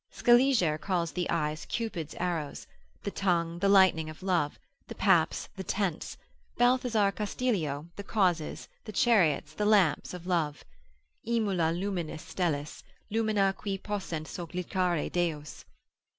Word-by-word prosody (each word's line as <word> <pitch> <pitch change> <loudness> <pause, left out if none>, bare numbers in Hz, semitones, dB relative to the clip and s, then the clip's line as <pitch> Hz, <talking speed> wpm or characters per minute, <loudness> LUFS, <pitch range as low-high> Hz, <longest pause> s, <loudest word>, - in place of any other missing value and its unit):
Scaliger 240 - +4
calls 175 -3 -1
the 180 -1 -2
eyes, 155 -1 -1
Cupid's 195 -10 -4
arrows; 170 -5 -3 0.4
the 200 - -3
tongue, 170 -4 0
the 200 +2 +2
lightning 185 -5 +5
of 155 +4 -11
love; 175 -6 0 0.3
the - - -8
paps, - - +2
the 190 - -5
tents: 190 -3 -2 0.4
Balthazar 245 -4 +3
Castilio, 195 - -2
the 200 - -5
causes, 180 -7 0 0.2
the 215 - -6
chariots, 165 - +3
the 210 - -1
lamps 190 -5 +3
of 175 -1 -9
love, 165 -5 -1 0.6
———aemula 190 -8 +1
lumina 180 -5 -3
stellis, 160 -3 -3 0.3
Lumina 215 -3 +2
quae 195 -1 -3
possent 190 -6 -4
sollicitare 175 0 -2
deos. 160 -4 -2
180 Hz, 125 wpm, -29 LUFS, 160-205 Hz, 0.6 s, lightning